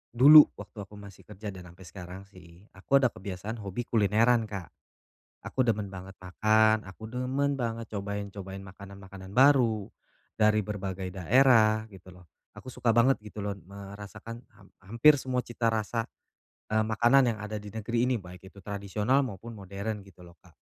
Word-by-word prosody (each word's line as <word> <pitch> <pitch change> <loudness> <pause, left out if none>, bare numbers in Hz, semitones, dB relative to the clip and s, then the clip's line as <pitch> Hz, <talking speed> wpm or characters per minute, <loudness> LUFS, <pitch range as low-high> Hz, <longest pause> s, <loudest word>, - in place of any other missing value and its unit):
dulu 145 +5 +9
waktu - - -12
aku 105 - -15
masih 100 -2 -13
kerja 105 +2 -7
dan 90 -2 -11
sampai 95 - -15
sekarang 95 +1 -9
sih, 90 -2 -17
aku 135 +9 +1
ada 125 - +3
kebiasaan 100 +4 -7
hobi 100 +3 -5
kulineran, 115 +2 +3
Kak. 100 -5 -7 0.7
Aku 130 - -1
demen 105 -3 0
banget 95 0 -10
makan, 110 +4 +2
aku 95 +4 -12
demen 130 +4 -1
banget 115 -1 -3
cobain-cobain 100 -1 -6
makanan-makanan 95 0 -12
baru, 125 -6 +4 0.5
dari 110 0 +3
berbagai 95 -2 -5
daerah, 110 +3 +4
gitu 95 -2 -14
loh. 90 -1 -17 0.3
Aku 130 - -10
suka 120 - -1
banget 120 +2 +3
gitu 105 0 -13
loh 100 - -2 0.2
merasakan 100 +3 -10 0.2
ham 100 -2 -18
hampir 115 +10 +5
semua 125 -1 -2
cita 120 -1 -1
rasa, 115 +1 -2 0.6
e 110 - -4
makanan 120 +4 +3
yang - - -12
ada 105 0 -6
di 105 - -9
negeri 115 +3 -1
ini 125 - +1
baik 90 -1 -12
itu 100 - -24
tradisional 105 +6 -1
maupun 115 -2 -6
modern 100 +1 -6
gitu 95 -2 -16
loh, 85 - -15
Kak. - - -21
105 Hz, 165 wpm, -28 LUFS, 95-115 Hz, 0.7 s, dulu